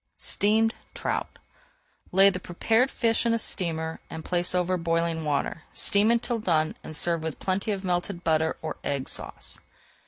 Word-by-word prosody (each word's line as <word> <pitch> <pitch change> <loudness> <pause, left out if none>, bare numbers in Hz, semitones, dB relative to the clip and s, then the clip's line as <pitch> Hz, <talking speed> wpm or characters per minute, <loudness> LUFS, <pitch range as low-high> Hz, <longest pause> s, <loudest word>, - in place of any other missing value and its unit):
STEAMED 220 +2 +2 0.2
TROUT - - -3 0.7
Lay 195 +2 +7
the 180 - -4
prepared 225 +8 +1
fish 230 -4 +1
in 230 -1 +2
a - - +1
steamer 160 -6 -2
and 160 - -7
place 180 0 +1
over 180 0 +1
boiling 165 -1 0
water, 150 +2 -1
steam 205 +2 +4
until 235 0 +1
done 160 -6 +1
and 155 - -4
serve 170 0 +2
with 160 -2 -4
plenty 195 +3 -1
of 200 -2 -1
melted 175 0 -1
butter 160 0 +1
or 155 - -4
Egg 140 -2 -2
Sauce. - - -4
180 Hz, 160 wpm, -27 LUFS, 160-205 Hz, 0.7 s, Lay